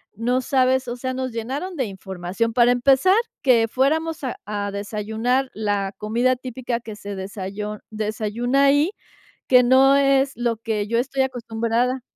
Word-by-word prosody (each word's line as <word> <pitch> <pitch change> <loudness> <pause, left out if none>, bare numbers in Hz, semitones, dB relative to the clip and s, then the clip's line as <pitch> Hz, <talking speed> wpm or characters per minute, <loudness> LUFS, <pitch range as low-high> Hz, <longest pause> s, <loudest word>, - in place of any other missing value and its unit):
no 245 +3 0
sabes, 260 -1 +2
o 240 - -3
sea, 255 +1 -4
nos 260 -1 -3
llenaron 270 +11 -4
de 260 -5 -1
información. 190 +3 -4
Para 245 0 +5
empezar, 270 +9 +4 0.3
que 235 -4 +4
fuéramos 310 +6 0
a 255 - -3
a 205 -1 -3
desayunar 220 +6 -1
la 205 -2 -1
comida 240 +4 +1
típica 250 -1 -4
que 220 -3 -9
se 205 -1 -7
desayo 200 +2 -5
desayuna 220 +5 0
ahí, 290 +6 +3 0.6
que 250 -1 +6
no 265 +2 +5
es 275 -1 +3
lo 235 -1 -1
que 215 -2 -2
yo 230 +2 0
estoy 265 +2 0
acostumbrada. 240 0 -1
240 Hz, 155 wpm, -22 LUFS, 215-260 Hz, 0.6 s, que